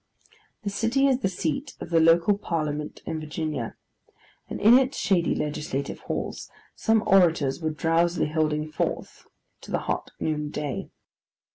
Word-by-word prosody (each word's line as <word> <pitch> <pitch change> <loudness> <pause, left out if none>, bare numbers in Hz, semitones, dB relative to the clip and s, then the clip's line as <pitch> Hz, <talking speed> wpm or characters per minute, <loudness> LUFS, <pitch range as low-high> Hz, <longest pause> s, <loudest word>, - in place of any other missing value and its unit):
The 200 - -2
city 230 +7 +1
is 265 -2 +3
the 190 - 0
seat 165 -5 -3
of 170 - -8
the 165 - +5
local 165 +5 +5
parliament 150 -6 -3
of 160 - -3
Virginia; 155 0 -4 0.7
and - - -5
in 235 +5 +7
its 265 +1 -1
shady 185 -4 +2
legislative 150 -2 -3
halls, - - -4 0.3
some 220 -1 +2
orators 165 -7 +3
were 160 - 0
drowsily 165 +2 +1
holding 155 -1 0
forth - - -3 0.3
to - - -12
the - - +1
hot - - -2
noon 150 -1 -1
day. 145 -3 -4
165 Hz, 145 wpm, -26 LUFS, 150-195 Hz, 0.7 s, in